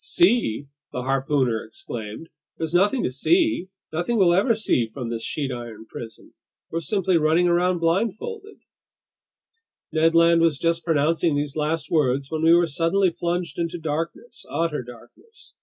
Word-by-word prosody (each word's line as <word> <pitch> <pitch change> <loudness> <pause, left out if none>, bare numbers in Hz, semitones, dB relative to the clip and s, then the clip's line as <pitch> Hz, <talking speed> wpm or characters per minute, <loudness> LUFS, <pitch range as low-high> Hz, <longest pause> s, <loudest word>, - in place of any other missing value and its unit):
"See!" 240 - +2 0.3
the 125 - -4
harpooner 135 -3 0
exclaimed. 110 +4 -8 0.3
"There's 160 0 -4
nothing 205 +8 +3
to - - -1
see, 320 - +2 0.3
nothing 175 +9 -1
we'll 180 -4 +5
ever 210 +6 +3
see 130 - +1
from 125 -1 -5
this 115 -1 -3
sheet 140 -3 -3
iron 120 -3 -7
prison! 115 0 -10 0.4
We're 165 - -1
simply 190 -1 +1
running 160 +3 +3
around 175 +1 +2
blindfolded—" 225 - -2 1.3
Ned 165 +1 +2
Land 170 0 +5
was 165 -4 +3
just 165 +2 0
pronouncing 160 0 +2
these 145 -1 -2
last 155 +1 -2
words 135 -3 +1
when 160 -1 -2
we 165 +1 +5
were 175 0 +4
suddenly 170 +4 +1
plunged 170 -2 -3
into 170 +1 -2
darkness, 165 - -5
utter 165 -4 -1
darkness. 360 - -13
165 Hz, 150 wpm, -23 LUFS, 140-180 Hz, 1.3 s, we'll